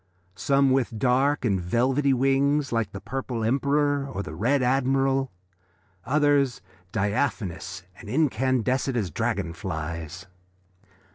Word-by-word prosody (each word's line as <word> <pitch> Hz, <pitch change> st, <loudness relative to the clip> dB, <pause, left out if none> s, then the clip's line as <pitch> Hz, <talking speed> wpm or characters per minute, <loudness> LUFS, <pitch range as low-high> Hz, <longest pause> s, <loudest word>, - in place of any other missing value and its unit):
Some 135 Hz, +5 st, +2 dB
with 125 Hz, -4 st, 0 dB
dark 130 Hz, +4 st, +2 dB
and 100 Hz, -5 st, +1 dB
velvety 130 Hz, +9 st, +1 dB
wings 135 Hz, +2 st, +2 dB
like 115 Hz, -3 st, -1 dB
the 95 Hz, -, -7 dB
Purple 130 Hz, -2 st, -4 dB
Emperor, 140 Hz, +3 st, +1 dB
or 100 Hz, -, -4 dB
the 75 Hz, -, -8 dB
Red 125 Hz, -, +1 dB
Admiral, 135 Hz, +1 st, +1 dB, 0.7 s
others 145 Hz, -1 st, +2 dB, 0.3 s
diaphanous 100 Hz, -3 st, -2 dB, 0.2 s
and 105 Hz, -, -10 dB
iridescent 130 Hz, -1 st, +1 dB
as 100 Hz, -7 st, -1 dB
dragon 85 Hz, +2 st, -2 dB
flies. 85 Hz, -1 st, -5 dB
130 Hz, 115 wpm, -25 LUFS, 100-135 Hz, 0.7 s, Some